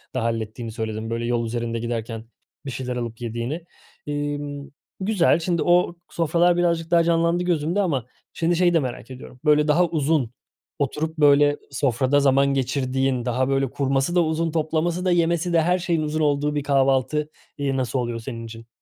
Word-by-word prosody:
da -, -, 0 dB
hallettiğini 115 Hz, 0 st, -3 dB
söyledin 110 Hz, -1 st, -4 dB
böyle 115 Hz, +1 st, -2 dB
yol 120 Hz, -1 st, 0 dB
üzerinde 115 Hz, 0 st, -3 dB
giderken 115 Hz, -1 st, -4 dB, 0.4 s
bir 135 Hz, -, -4 dB
şeyler 125 Hz, 0 st, -4 dB
alıp 115 Hz, -1 st, -5 dB
yediğini. 120 Hz, +8 st, -4 dB, 0.4 s
İmm, 145 Hz, -1 st, -4 dB, 0.3 s
güzel, 190 Hz, -4 st, +2 dB
şimdi, 170 Hz, -1 st, 0 dB
o 175 Hz, 0 st, +3 dB
sofralar 170 Hz, +1 st, +2 dB
birazcık 170 Hz, -1 st, 0 dB
daha 170 Hz, -1 st, +5 dB
canlandı 170 Hz, +1 st, +2 dB
gözümde 175 Hz, +3 st, 0 dB
ama, 140 Hz, -, -1 dB, 0.3 s
şimdi, 170 Hz, +1 st, +1 dB
şeyi 175 Hz, 0 st, +3 dB
de 165 Hz, -, +4 dB
merak 125 Hz, -2 st, -5 dB
ediyorum. 125 Hz, 0 st, -11 dB
Böyle, 150 Hz, 0 st, +4 dB
daha 170 Hz, +4 st, +4 dB
uzun 150 Hz, -6 st, 0 dB, 0.5 s
oturup, 155 Hz, +3 st, -2 dB
böyle, 145 Hz, 0 st, +5 dB
sofrada 135 Hz, +1 st, +1 dB
zaman 140 Hz, 0 st, +4 dB
geçirdiğin, 130 Hz, -1 st, 0 dB
daha, 130 Hz, +2 st, 0 dB
böyle, 135 Hz, -1 st, +1 dB
kurması 135 Hz, +4 st, 0 dB
da 175 Hz, -, +5 dB
uzun, 160 Hz, +1 st, -1 dB
toplaması 165 Hz, +3 st, -1 dB
da, 180 Hz, -, +3 dB
yemesi 170 Hz, 0 st, +1 dB
de... 165 Hz, -, +5 dB
Her 180 Hz, +3 st, +2 dB
şeyin 170 Hz, -3 st, 0 dB
uzun 155 Hz, +1 st, -2 dB
olduğu 150 Hz, 0 st, +1 dB
bir 145 Hz, -, -1 dB
kahvaltı, 135 Hz, +2 st, +1 dB, 0.3 s
iii, 140 Hz, -2 st, -1 dB
nasıl 130 Hz, 0 st, -1 dB
oluyor 120 Hz, -1 st, -3 dB
senin 115 Hz, 0 st, -7 dB
için? 115 Hz, 0 st, -10 dB
145 Hz, 170 wpm, -23 LUFS, 125-165 Hz, 0.5 s, daha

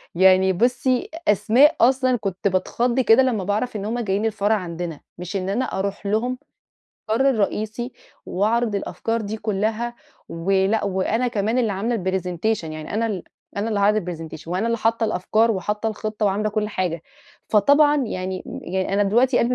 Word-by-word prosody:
يعني 190 Hz, +1 st, +5 dB
بُصّي، 245 Hz, +4 st, +1 dB, 0.2 s
أسماء 235 Hz, -, +5 dB
أصلًا 255 Hz, +1 st, +4 dB
كنت 195 Hz, -3 st, -2 dB
باتخض 235 Hz, +7 st, 0 dB
كده 250 Hz, +1 st, +5 dB
لمّا 230 Hz, -7 st, 0 dB
باعرف 210 Hz, +5 st, -1 dB
إن 200 Hz, -1 st, -3 dB
هُم 235 Hz, +3 st, -2 dB
جايين 205 Hz, -1 st, -1 dB
الفرع 215 Hz, 0 st, +1 dB
عندنا، 170 Hz, -4 st, -5 dB, 0.2 s
مش 180 Hz, +3 st, -6 dB
إن 190 Hz, 0 st, -2 dB
أنا 245 Hz, +6 st, 0 dB
أروح 200 Hz, +1 st, -3 dB
لهم 235 Hz, +5 st, 0 dB, 0.7 s
المقر 265 Hz, +5 st, +3 dB
الرئيسي 220 Hz, +2 st, -2 dB, 0.3 s
وأعرض 220 Hz, +3 st, 0 dB
الأفكار 225 Hz, +3 st, -2 dB
دي 215 Hz, +1 st, -4 dB
كلّها. 220 Hz, +3 st, -2 dB, 0.3 s
ولأ، 195 Hz, +5 st, +1 dB
وأنا 205 Hz, +6 st, 0 dB
كمان 225 Hz, +2 st, 0 dB
اللي 225 Hz, -4 st, +1 dB
عاملة 225 Hz, +5 st, -1 dB
الpresentation، 185 Hz, +1 st, -1 dB
يعني 155 Hz, +3 st, -6 dB
أنا 230 Hz, +1 st, +1 dB
ال 195 Hz, -6 st, -3 dB, 0.3 s
أنا 210 Hz, +3 st, -1 dB
اللي 205 Hz, -2 st, 0 dB
هاعرض 210 Hz, 0 st, +3 dB
الpresentation 160 Hz, -2 st, -8 dB
وأنا 185 Hz, +6 st, -1 dB
اللي 230 Hz, 0 st, 0 dB
حاطة 225 Hz, +1 st, +1 dB
الأفكار 220 Hz, +3 st, +1 dB
وحاطة 210 Hz, +2 st, -1 dB
الخطة 215 Hz, 0 st, -2 dB
وعاملة 205 Hz, +2 st, 0 dB
كل 210 Hz, 0 st, -1 dB
حاجة، 175 Hz, -5 st, -2 dB, 0.5 s
فطبعًا 285 Hz, +8 st, +5 dB
يعني 185 Hz, -1 st, -4 dB, 0.2 s
يعني 190 Hz, +1 st, -2 dB
أنا 205 Hz, -, +3 dB
دلوقتي 245 Hz, +5 st, +3 dB
قلبي 240 Hz, +2 st, +2 dB
210 Hz, 165 wpm, -22 LUFS, 190-230 Hz, 0.7 s, يعني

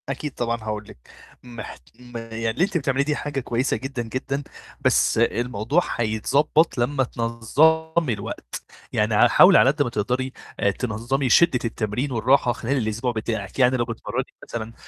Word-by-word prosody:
أكيد 140 Hz, +2 st, -4 dB
طبعًا 115 Hz, -1 st, -2 dB
هاقول 105 Hz, -1 st, -4 dB
لِك، 60 Hz, -, -16 dB, 0.3 s
محت 120 Hz, -3 st, -9 dB, 0.2 s
م 120 Hz, -1 st, -9 dB
يعني 115 Hz, 0 st, -4 dB
اللي 110 Hz, +10 st, 0 dB
أنتِ 195 Hz, -1 st, +1 dB
بتعمليه 135 Hz, -2 st, 0 dB
دي 150 Hz, +1 st, -1 dB
حاجة 145 Hz, -2 st, -3 dB
كويسة 125 Hz, +1 st, -1 dB
جدًا، 135 Hz, -2 st, -5 dB
جدًا، 135 Hz, +4 st, -3 dB, 0.4 s
بس -, -, +3 dB
الموضوع 120 Hz, +5 st, +1 dB
هيتضبّط 135 Hz, +9 st, +1 dB
لمّا 130 Hz, +3 st, +1 dB
تنظّمي 145 Hz, +7 st, +1 dB
الوقت، 100 Hz, -, -7 dB, 0.3 s
يعني -, -, +1 dB
ع -, -, +6 dB
حاولي -, -, +7 dB
على 130 Hz, -, +6 dB
قد 150 Hz, +2 st, 0 dB
ما 120 Hz, -, -3 dB
تقدري 125 Hz, +4 st, -2 dB, 0.3 s
آآ 100 Hz, -, +2 dB
تنظّمي 125 Hz, +5 st, -2 dB
شدة 165 Hz, -5 st, +5 dB
التمرين 115 Hz, +4 st, -2 dB
والراحة 125 Hz, +2 st, +3 dB
خلال 135 Hz, +5 st, -2 dB
الأسبوع 115 Hz, +1 st, -1 dB
بتاعِك، 110 Hz, -1 st, -4 dB
يعني 130 Hz, 0 st, +4 dB
لو 120 Hz, -, 0 dB
بتتمرّني 115 Hz, -1 st, -4 dB, 0.2 s
مثلًا 115 Hz, -1 st, -6 dB
120 Hz, 160 wpm, -23 LUFS, 115-135 Hz, 0.4 s, حاولي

